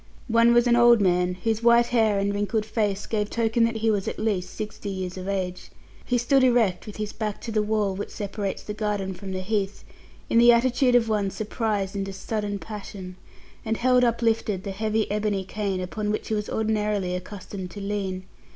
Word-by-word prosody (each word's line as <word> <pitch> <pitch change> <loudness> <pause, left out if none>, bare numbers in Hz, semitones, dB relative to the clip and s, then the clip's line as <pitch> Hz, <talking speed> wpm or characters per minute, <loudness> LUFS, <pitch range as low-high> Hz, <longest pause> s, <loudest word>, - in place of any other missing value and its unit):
One 230 +1 +5
was 240 0 +5
an 240 -1 +4
old 240 -1 +6
man, 180 -2 +2
whose 225 -1 0
white 235 0 +5
hair 220 -4 +2
and 200 +1 0
wrinkled 205 +2 -1
face 210 -2 -1
gave 210 -2 -1
token 230 0 +2
that 230 0 -1
he 225 - +4
was 200 -2 -1
at - - -3
least 200 -5 -1
sixty 215 -1 -5
years 185 -2 -4
of 185 0 -6
age. 185 -2 -3 0.3
He 245 - 0
stood 260 +3 +3
erect 230 -8 +2
with 210 - -7
his 210 -1 -4
back 210 -2 -3
to 230 - -5
the 215 -1 +2
wall, 210 -2 0
which 200 - -5
separates 200 -1 -4
the 210 - -5
garden 210 -3 -2
from 190 +1 -8
the 185 0 -3
Heath, 200 0 -2 0.4
in 230 - +3
the 240 0 +8
attitude 250 +1 +3
of 235 -2 +4
one 210 -3 +1
surprised 210 -2 -2
into 195 -1 -3
sudden 205 +1 -3
passion, 195 -3 -8 0.5
and 220 0 -1
held 250 0 +3
uplifted 225 -4 +1
the 200 - -4
heavy 215 +2 0
ebony 205 -2 0
cane 195 -1 -3
upon 210 +3 -3
which 215 - -2
he - - 0
was 210 -1 -2
ordinarily 210 -4 0
accustomed 185 0 -6
to 205 - -9
lean. 195 -2 -3
210 Hz, 200 wpm, -25 LUFS, 195-225 Hz, 0.5 s, the